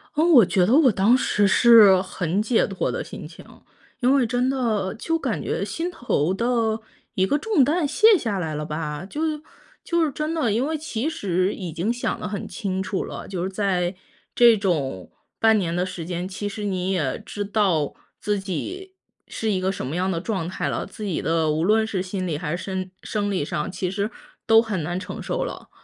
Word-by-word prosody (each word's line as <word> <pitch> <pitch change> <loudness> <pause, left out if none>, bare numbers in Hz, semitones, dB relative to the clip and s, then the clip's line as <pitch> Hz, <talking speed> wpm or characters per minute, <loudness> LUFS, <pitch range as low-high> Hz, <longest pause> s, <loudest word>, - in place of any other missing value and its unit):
嗯， 325 +4 +3
我 235 -8 +8
觉 185 -1 +2
得 225 - +2
我 290 -5 +6
当 205 +5 +4
时 205 -5 +2
是 210 -3 +7
很 185 0 -2
解 225 +1 +2
脱 195 -2 -2
的 - - -3
心 - - -9
情， - - -14 0.5
因 250 +1 +3
为 270 -3 +3
真 245 +2 0
的 225 -8 0
就 330 +8 -1
感 - - -2
觉 - - -2
心 335 +2 -3
头 185 - 0
的 230 0 0 0.3
一 190 -4 +1
个 290 - +2
重 360 -3 +2
担 300 +3 +1
卸 435 +6 +5
下 220 - -2
来 160 -3 -3
了 150 0 -3
吧。 150 +1 -4
就 300 +8 -5 0.6
就 340 -1 +1
是 300 - 0
真 305 +4 -3
的， 295 -9 +1
因 230 +6 +1
为 315 +1 -1
其 290 -3 -3
实 185 - 0
已 180 -4 -6
经 175 +9 -1
想 245 - -2
得 - - -4
很 200 -1 -5
清 190 -2 -3
楚 190 0 -2
了， - - -7
就 185 -3 -4
是 190 - -2
在 185 -2 -1 0.4
这 235 -2 +6
种 145 - -2 0.3
半 220 -1 +5
年 170 -3 -1
的 180 +1 0
时 180 -2 -6
间， 175 +1 -3
其 200 +2 -4
实 210 +1 -6
你 190 -2 -1
也 155 -9 -1
知 205 -1 -5
道 190 -8 +1 0.3
自 210 -1 -1
己 365 - -5 0.3
是 220 -1 -2
一 185 -2 0
个 190 +1 +1
什 190 - -5
么 145 +6 -4
样 185 +1 0
的 165 - -1
状 185 -3 -3
态 - - -3
了， - - -2
自 215 - -9
己 195 -5 -2
的 160 -1 +1
无 155 +2 0
论 220 +4 +3
是 200 -4 -2
心 185 0 -4
理 160 - -1
还 170 0 -3
是 - - -8
身 190 -1 -4
生 205 -1 -2
理 185 -7 -1
上， 150 +4 -3
其 185 -1 -3
实 200 +2 -1 0.4
都 225 0 +7
很 210 -6 -3
难 175 +4 -3
承 - - -7
受 - - -2
了。 - - -7
200 Hz, 230 characters per minute, -23 LUFS, 180-235 Hz, 0.6 s, 我